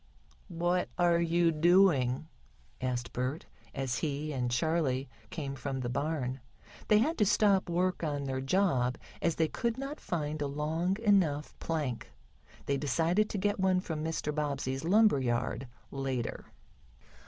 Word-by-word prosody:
"What 175 0 0
are 175 -1 +4
you 170 0 +3
doing?" 160 -5 +4 0.5
asked 125 -2 -2
Bert, 130 +5 -2 0.3
as 135 -3 -1
he 150 0 -2
and 125 -2 -1
Charley 135 0 0 0.2
came 140 -4 -4
from 135 +1 -4
the 120 - -2
barn. 140 -1 -2 0.5
They 210 - +6
had 300 +10 +1
to - - +5
stop 200 -3 +3
work 180 +1 0
on 145 -3 -1
their 130 -1 -2
job, 135 -5 +1 0.2
as 165 -2 +1
they 160 - +2
could 235 +7 -2
not 275 +3 -5
find 155 -3 -3
a 145 - 0
long 160 +6 -1
enough 170 -9 +2
plank. 150 -7 -3 0.6
They 140 - +1
decided 165 +9 +1
to - - -3
get 205 +1 0
one 190 -1 +3
from 160 -4 -4
Mr. 160 -2 -2
Bobbsey's 140 -3 -2
lumber 210 -2 +5
yard, 125 +1 -1 0.2
later. 135 -3 -3
155 Hz, 145 wpm, -31 LUFS, 135-180 Hz, 0.6 s, They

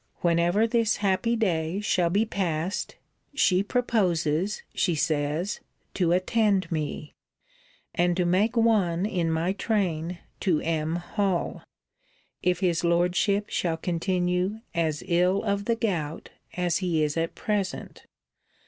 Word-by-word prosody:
'Whenever 175 +5 +3
this 230 -1 +2
happy 205 +4 +1
day 175 -5 0
shall 185 -5 +1
be 205 +6 +2
passed, 185 -3 -2 0.4
she 185 -9 +3
proposes, 195 - 0
she 175 -3 +1
says, 155 +5 -1 0.3
to 175 -3 +1
attend 190 0 +2
me, 150 -1 -3 0.8
and 175 0 +1
to 180 - +2
make 200 +7 +2
one 200 -6 +3
in 175 -6 0
my 165 +3 0
train 180 -6 -1 0.2
to 175 -6 +2
M. 160 0 -1
Hall, 180 +1 -1 0.8
if 180 +1 +1
his 175 -3 +1
Lordship 180 +4 +1
shall 165 -2 0
continue 180 +4 -1
as 160 -3 -1
ill 180 +3 +2
of 200 -1 -1
the 230 - +1
gout 170 -9 -3 0.3
as 180 -1 +1
he 170 -4 +1
is 150 -1 -1
at 165 0 -2
present. 205 -3 -3
180 Hz, 125 wpm, -26 LUFS, 165-200 Hz, 0.8 s, Whenever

